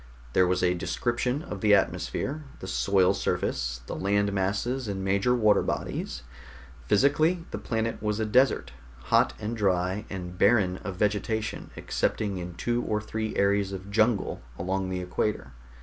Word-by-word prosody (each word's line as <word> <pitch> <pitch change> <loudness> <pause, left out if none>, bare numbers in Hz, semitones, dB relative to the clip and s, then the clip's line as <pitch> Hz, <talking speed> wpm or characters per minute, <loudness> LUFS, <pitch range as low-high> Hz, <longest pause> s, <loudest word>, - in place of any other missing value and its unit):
There 90 -1 +4
was 90 0 +1
a 90 0 +4
description 120 - -1
of 100 - -7
the 105 -1 +6
atmosphere, 140 +8 -1 0.2
the - - -7
soil 90 +10 +3
surface, 60 -2 -1
the - - -5
land 100 +1 +1
masses 105 +7 -1
and 95 -1 -3
major 100 +6 +2
water 110 -3 +4
bodies. - - -3 0.6
Physically, 155 - +3
the - - -4
planet 115 -1 -2
was 105 0 -1
a 110 - +1
desert, 105 - +3 0.4
hot - - +5
and 110 +2 -3
dry, 95 -1 0
and 90 -2 -6
barren 100 -4 +4
of 100 -1 -6
vegetation 105 +2 -1
excepting 100 -4 -1
in 90 -1 -6
two 120 +4 0
or 105 -2 -1
three 110 0 -4
areas 100 0 +2
of 95 +1 -7
jungle 110 - +1 0.2
along 95 +1 -2
the 90 -1 -2
equator. 90 -5 -2
100 Hz, 155 wpm, -27 LUFS, 95-110 Hz, 0.6 s, the